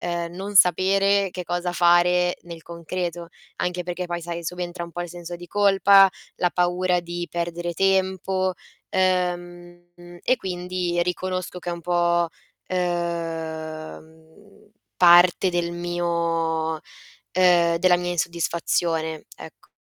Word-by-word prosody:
uhm, 170 -1 -3
non 200 +2 -6
sapere 195 +2 +4
che 180 - -5
cosa 175 0 -2
fare 175 0 +3
nel 170 -1 -10
concreto. 170 0 -5 0.3
Anche 180 0 -2
perché 180 0 -4
poi, 175 0 -4
sai, 170 0 -6
subentra 175 +1 -4
un 170 - -12
po' 175 - -5
il 175 - -4
senso 175 0 -8
di 175 0 -11
colpa, 200 -1 +6 0.3
la 180 - +1
paura 180 0 +1
di 175 0 -5
perdere 175 0 -3
tempo, 190 0 +1 0.4
uhm, 175 -1 -2
e 255 - +2
quindi, 180 -2 -2
riconosco 185 0 -3
che 175 0 -5
è - - -2
un 170 - -6
po', 175 0 +1 0.4
uhm, 165 +1 -5 0.3
parte 175 +1 +6
del 175 -1 -1
mio 170 -2 -1
uhm, 155 - -8 1.0
della 180 +1 +4
mia 175 0 -3
insoddisfazione, 165 -1 -1
ecco. - - -13
175 Hz, 125 wpm, -23 LUFS, 170-180 Hz, 1.0 s, colpa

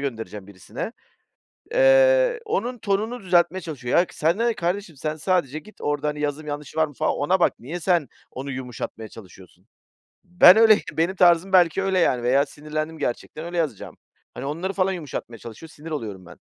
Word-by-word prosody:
göndereceğim 110 -7 -6
birisine. 100 - -7 0.8
Eee, - - +4
onun 245 - -2
tonunu 215 +3 -2
düzeltmeye 180 0 +2
çalışıyor. 140 -8 -2
Ya, 175 - +3
sana 170 +9 0
ne 235 - +1
kardeşim, 175 0 -3
sen 155 +3 -3
sadece 155 -3 -1
git 215 +4 -17
orada, 145 0 -1
hani, 150 0 -3
yazım 150 +1 -3
yanlışı 150 +1 -6
var 160 0 +3
mı 145 - -14
falan, - - 0
ona 185 +6 +1
bak, - - +3
niye 155 +9 -6
sen 175 -4 +1 0.2
onu 135 +2 -6
yumuşatmaya 125 -3 -6
çalışıyorsun? 95 -2 -15 0.6
Ben 180 +2 +7
öyleyim, 220 -2 +6
benim 170 +4 0
tarzım 180 +1 +4
belki 180 +1 +4
öyle 190 -1 +1
yani 125 -8 +1
veya 135 +3 +3
sinirlendim, 155 +2 -5
gerçekten 155 +4 -4
öyle 175 +1 -5
yazacağım. 150 - -3 0.4
Hani, 130 - -7
onları 170 +7 -3
falan 190 -1 +1
yumuşatmaya 145 -8 -7
çalışıyor, 115 +10 -11
sinir 160 +1 -11
oluyorum 105 -10 -5
ben. - - -14
160 Hz, 175 wpm, -23 LUFS, 140-190 Hz, 0.8 s, Ben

